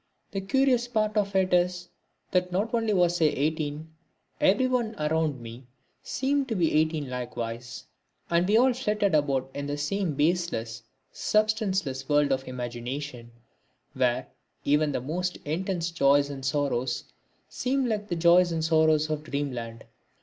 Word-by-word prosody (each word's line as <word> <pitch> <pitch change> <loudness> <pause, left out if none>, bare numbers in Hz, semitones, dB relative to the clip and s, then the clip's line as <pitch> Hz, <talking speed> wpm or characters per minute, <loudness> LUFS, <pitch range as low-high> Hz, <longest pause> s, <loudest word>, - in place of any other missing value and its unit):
The 195 - -3
curious 250 +3 +2
part 215 -3 0
of 200 -2 0
it 185 -1 +2
is 180 0 +1 0.4
that 180 0 +1
not 205 +6 -1
only 225 -2 +1
was 175 -3 +2
I - - +6
eighteen, 155 +1 -1 0.5
but - - +1
everyone 235 +1 +1
around 155 -3 0
me 120 +2 -10 0.3
seemed 275 +1 -1
to 225 - -2
be 170 -4 +1
eighteen 155 -1 +1
likewise; 120 -1 -5 0.4
and 170 +1 +2
we 215 - +5
all 255 +2 +5
flitted 210 -6 0
about 135 -3 +1
in 140 0 -4
the 145 0 -3
same 160 +2 -1
baseless, 145 -8 0 0.3
substanceless 195 - 0
world 145 -1 +3
of 130 0 -1
imagination, 125 +1 -5 0.6
where 125 0 +1 0.4
even 150 +1 +3
the 130 - -2
most 180 +7 -2
intense 170 +2 -2
joys 140 -2 +3
and 135 -1 -7
sorrows 135 -3 -1 0.4
seemed 265 0 -1
like 210 -2 -2
the 175 - -2
joys 175 +1 +5
and 160 -1 -1
sorrows 155 -1 +3
of 155 -1 -2
dreamland. 125 -6 -4
160 Hz, 150 wpm, -27 LUFS, 140-195 Hz, 0.6 s, I